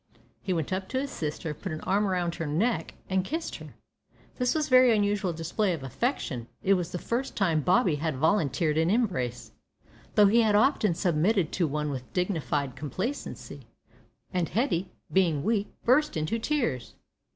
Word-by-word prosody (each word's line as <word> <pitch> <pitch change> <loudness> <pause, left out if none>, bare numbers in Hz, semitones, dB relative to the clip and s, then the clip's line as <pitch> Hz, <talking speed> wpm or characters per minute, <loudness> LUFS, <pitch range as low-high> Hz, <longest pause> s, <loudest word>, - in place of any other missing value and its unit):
He 190 - -3
went 165 0 -1
up 190 0 -3
to 260 - -1
his 280 +1 -3
sister, 155 +1 -4
put 185 +5 -6
an 155 - -5
arm 205 +2 +1
round 180 -2 0
her 165 -2 -4
neck, 200 +12 0
and 190 -1 +1
kissed 320 - -4
her. - - -12 0.6
This 250 +2 +1
was 310 -1 +1
a - - -9
very 255 -2 +7
unusual 205 -3 +1
display 175 +5 -1
of 155 -5 -5
affection. 135 - -2 0.2
It 195 - +4
was 180 -2 -1
the - - -3
first 240 +8 -3
time 170 -6 +2
Bobby 180 - +3
had 155 0 -2
volunteered 155 0 +1
an 165 +1 +2
embrace, 180 - -1 0.6
though 210 - +7
he 225 +4 +5
had 215 -2 +3
often 215 - +3
submitted 175 +1 +1
to 175 -3 +1
one 150 0 -2
with 130 -2 -6
dignified 150 -7 -1
complacency, 185 - -5 0.7
and 180 -3 0
Hetty, 190 - 0 0.2
being 170 -7 +2
weak, 215 0 0
burst 275 - +3
into 155 +9 -1
tears. 235 - -1
185 Hz, 175 wpm, -28 LUFS, 155-220 Hz, 0.7 s, very